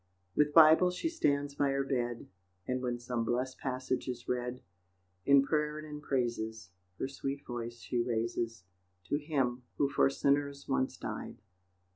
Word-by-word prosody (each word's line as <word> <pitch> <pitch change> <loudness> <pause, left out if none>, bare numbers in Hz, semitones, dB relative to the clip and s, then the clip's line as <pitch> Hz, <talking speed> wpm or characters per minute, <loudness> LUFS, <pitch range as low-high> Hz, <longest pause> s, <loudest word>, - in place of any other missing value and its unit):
With 150 0 +4
Bible 160 +3 +8
she 180 - -2
stands 145 - +1
by 140 0 +1
her 135 0 +1
bed, 120 -3 -2 0.4
And 130 0 -1
when 125 -1 -1
some 120 -1 -2
blest 125 +3 -1
passage 130 0 -2
is 125 -1 -5
read, 125 0 -2 0.6
In 140 -1 +7
prayer 150 +1 0
and 155 0 -7
in 150 -1 -7
praises 110 -7 -2 0.3
Her - - -2
sweet 135 +1 -4
voice 120 -1 -5
she 120 0 -1
raises 115 -2 -2 0.5
To 145 - +2
Him 135 -5 0 0.2
who 140 - +2
for 140 - +4
sinners 140 0 0
once 135 -1 0
died. - - -5
130 Hz, 155 wpm, -32 LUFS, 120-145 Hz, 0.6 s, Bible